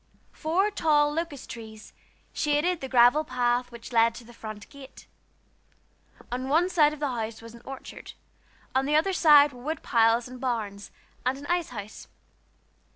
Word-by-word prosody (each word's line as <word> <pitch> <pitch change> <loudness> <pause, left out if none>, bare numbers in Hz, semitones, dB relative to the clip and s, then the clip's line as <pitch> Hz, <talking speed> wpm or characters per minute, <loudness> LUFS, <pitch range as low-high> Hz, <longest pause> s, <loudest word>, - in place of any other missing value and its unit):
Four 365 +6 0
tall 295 -5 +2
locust 320 -4 -5
trees 220 -2 -10 0.4
shaded 305 +4 0
the 265 - -5
gravel 250 +4 +5
path 245 -2 0
which 235 +1 -11
led 230 0 +4
to 240 - -10
the 240 +1 -15
front 215 -3 -9
gate. 275 -1 -13 1.3
On 255 +2 -3
one 335 +5 +3
side 305 -5 +4
of 305 - -8
the 290 -2 -1
house 225 -3 -4
was 230 0 -12
an 235 - -13
orchard; 270 -1 -9 0.6
on 265 +1 +1
the 300 - +2
other 330 +5 +2
side 295 -4 +6
were 245 - -12
wood 310 +5 -4
piles 230 +1 +3
and 255 0 -11
barns, 215 -6 -3 0.3
and 255 +2 0
an 285 - -10
ice 350 0 -1
house. 210 -3 -9
260 Hz, 165 wpm, -27 LUFS, 235-300 Hz, 1.3 s, side